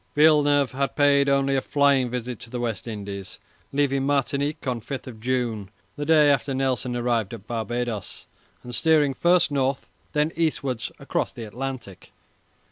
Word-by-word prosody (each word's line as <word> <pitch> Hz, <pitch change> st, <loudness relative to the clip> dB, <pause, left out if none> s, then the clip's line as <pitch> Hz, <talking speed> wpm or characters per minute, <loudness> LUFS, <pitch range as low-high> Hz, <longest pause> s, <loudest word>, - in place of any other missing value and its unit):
Villeneuve 145 Hz, -2 st, +4 dB
had 135 Hz, +1 st, -2 dB
paid 140 Hz, -1 st, +4 dB
only 140 Hz, 0 st, +2 dB
a 135 Hz, -, +2 dB
flying 140 Hz, -3 st, +2 dB
visit 125 Hz, -1 st, -4 dB
to -, -, -10 dB
the 125 Hz, +1 st, -4 dB
West 120 Hz, -2 st, -3 dB
Indies, 100 Hz, -3 st, -6 dB, 0.3 s
leaving 140 Hz, -1 st, +1 dB
Martinique 140 Hz, +1 st, 0 dB
on 125 Hz, -3 st, -1 dB
5 130 Hz, -2 st, -7 dB
June, 115 Hz, -4 st, -2 dB, 0.3 s
the 145 Hz, 0 st, -4 dB
day 155 Hz, -2 st, +6 dB
after 135 Hz, 0 st, 0 dB
Nelson 130 Hz, -2 st, -1 dB
arrived 120 Hz, -4 st, 0 dB
at 100 Hz, -, -13 dB
Barbadoes, 120 Hz, -1 st, -4 dB, 0.4 s
and 125 Hz, -, -8 dB
steering 150 Hz, -1 st, +3 dB
first 175 Hz, +2 st, +3 dB
north, 135 Hz, -1 st, 0 dB, 0.3 s
then 150 Hz, +1 st, +1 dB
eastwards 140 Hz, -7 st, -1 dB
across -, -, -2 dB
the 115 Hz, -, -7 dB
Atlantic. 120 Hz, -3 st, -7 dB
135 Hz, 150 wpm, -24 LUFS, 120-145 Hz, 0.4 s, day